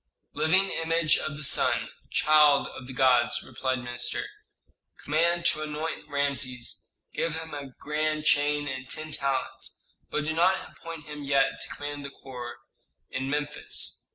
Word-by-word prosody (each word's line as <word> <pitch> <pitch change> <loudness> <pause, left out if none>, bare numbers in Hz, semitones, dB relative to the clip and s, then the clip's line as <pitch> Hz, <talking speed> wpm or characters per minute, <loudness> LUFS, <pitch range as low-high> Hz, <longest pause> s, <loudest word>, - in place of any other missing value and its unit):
"Living 190 +5 +3
image 165 -1 +2
of 150 - -4
the 150 - -5
sun, - - +2 0.2
child 150 -2 +5
of 125 - -9
the 130 - -7
gods," 125 -2 +4
replied 130 -1 -1
the 125 - -7
minister. 120 0 -2 0.8
"Command 170 +3 +2
to 155 - +3
anoint 155 0 -4
Rameses, 140 -4 0 0.2
give 165 -1 0
him 160 -1 -6
a 145 -1 -5
grand 155 0 -1
chain 145 -1 +3
and 130 -1 -5
ten 155 0 -5
talents, 135 -2 -2 0.3
but 150 - 0
do 155 - 0
not 180 +4 +2
appoint 165 -2 -9
him 150 -1 -7
yet 140 -1 +2
to - - -4
command 145 0 -5
the 140 - -5
corps 125 -3 -8 0.5
in 135 0 -2
Memphis. 145 +1 -2
145 Hz, 155 wpm, -28 LUFS, 135-155 Hz, 0.8 s, child